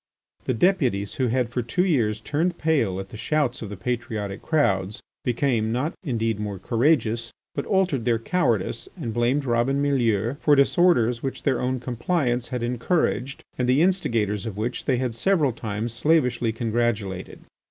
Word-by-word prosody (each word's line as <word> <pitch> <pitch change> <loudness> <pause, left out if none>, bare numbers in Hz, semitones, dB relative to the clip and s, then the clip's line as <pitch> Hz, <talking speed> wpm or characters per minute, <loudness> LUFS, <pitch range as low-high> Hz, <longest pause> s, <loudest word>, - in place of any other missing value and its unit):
The 130 - 0
deputies 125 - +1
who 130 - +3
had 120 0 0
for 125 +1 -2
two 180 +11 0
years 115 - +1
turned 165 +7 -1
pale 135 -13 +1
at 95 0 -7
the 110 - -9
shouts 145 0 0
of 110 - -5
the 100 - -7
patriotic 105 -2 -3
crowds 100 - +1 0.2
became, 120 -3 0
not 130 +7 -1
indeed 115 - -1
more 105 -2 -4
courageous, 115 - +1 0.2
but - - -4
altered 190 - +1
their 115 -1 +2
cowardice 115 - -1
and 115 - -3
blamed 120 +5 +1
Robin 120 +3 +1
Mielleux 120 -4 +1
for 150 -2 +4
disorders 135 -5 +3
which 135 - -4
their 130 -4 +1
own 130 +1 -1
compliance 125 0 -1
had 125 -2 -3
encouraged, 125 +2 -1 0.2
and 125 0 +1
the 135 +5 +4
instigators 115 - 0
of 105 -3 -6
which 115 +4 -3
they 130 - +2
had 125 -2 -1
several 150 +2 +2
times 110 0 -4
slavishly 125 -3 +2
congratulated. 110 -5 -2
120 Hz, 165 wpm, -24 LUFS, 110-140 Hz, 0.2 s, for